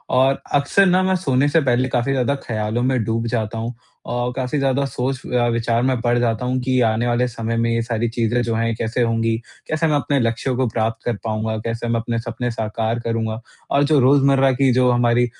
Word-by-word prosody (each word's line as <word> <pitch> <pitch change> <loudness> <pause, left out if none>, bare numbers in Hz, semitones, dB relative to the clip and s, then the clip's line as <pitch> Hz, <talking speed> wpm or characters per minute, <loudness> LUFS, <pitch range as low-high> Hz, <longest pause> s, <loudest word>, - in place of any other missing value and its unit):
और 135 +1 +3
अक्सर 145 +8 +3
न 185 0 +3
मैं 190 0 +2
सोने 140 -6 +1
से 160 +2 +3
पहले 125 +1 +2
काफ़ी 125 +1 0
ज़्यादा 135 +1 +1
ख़यालों 110 +1 -1
में 130 -2 +1
डूब 115 +2 -1
जाता 115 -1 -2
हूँ 115 +2 -4 0.3
और 120 0 -2
काफ़ी 130 +2 -2
ज़्यादा 135 0 +1
सोच 130 0 -3
अ, 120 -1 +1
विचार 115 0 0
में 130 -1 +1
पड़ 120 0 +1
जाता 120 0 0
हूँ 130 +1 0
कि 130 0 +1
आने 110 +2 0
वाले 120 +1 +1
समय 115 -1 -3
में 115 0 +1
ये 115 0 +1
सारी 115 0 -1
चीज़ें 120 +1 0
जो 115 -1 -1
हैं 115 0 0
कैसे 115 +2 -2
होंगी? 115 -1 +1 0.3
कैसे 155 +1 0
मैं 150 - +2
अपने 145 -1 +1
लक्ष्यों 115 +2 -1
को 130 -1 +1
प्राप्त 110 0 -2
कर 120 - 0
पाऊँगा? 110 0 -2
कैसे 115 +2 -4
मैं 115 0 +1
अपने 115 0 -2
सपने 120 +1 -4
साकार 110 +1 -2
करूँगा? 115 -1 -2 0.3
और 140 - +3
जो 145 0 +3
रोज़मर्रा 135 0 +4
की 130 +1 +2
जो 125 0 +3
हमारी 120 0 +3
120 Hz, 220 wpm, -20 LUFS, 115-130 Hz, 0.3 s, रोज़मर्रा